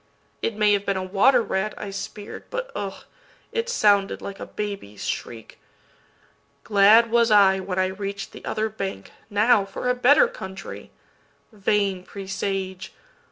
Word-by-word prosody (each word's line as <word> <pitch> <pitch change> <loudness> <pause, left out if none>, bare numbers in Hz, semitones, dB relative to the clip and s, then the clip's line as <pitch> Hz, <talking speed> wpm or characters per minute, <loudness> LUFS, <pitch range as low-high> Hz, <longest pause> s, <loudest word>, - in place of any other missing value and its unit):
—It 230 - -1
may 210 -1 +4
have 200 -1 +1
been 195 -1 -1
a 190 - -2
water 220 +7 +4
rat 200 +1 -2
I 205 -2 -6
spear'd, 205 +1 -7
But, - - -4
ugh! 200 -1 -5 0.5
it 460 +1 -2
sounded 205 - +3
like 200 0 -8
a - - -7
baby's 200 - -6
shriek. 115 -2 -6 1.0
Glad 215 +3 +5
was 235 0 +4
I 195 -2 +5
when 185 -1 -4
I 185 - +3
reach'd 195 +1 -5
the - - -12
other 220 0 -1
bank. 195 - -6 0.2
Now 210 +1 +4
for 195 +5 -5
a - - +4
better 265 - +5
country. 195 - -9 0.6
Vain 200 -2 0
presage! 190 0 -4
200 Hz, 150 wpm, -24 LUFS, 195-220 Hz, 1.0 s, Glad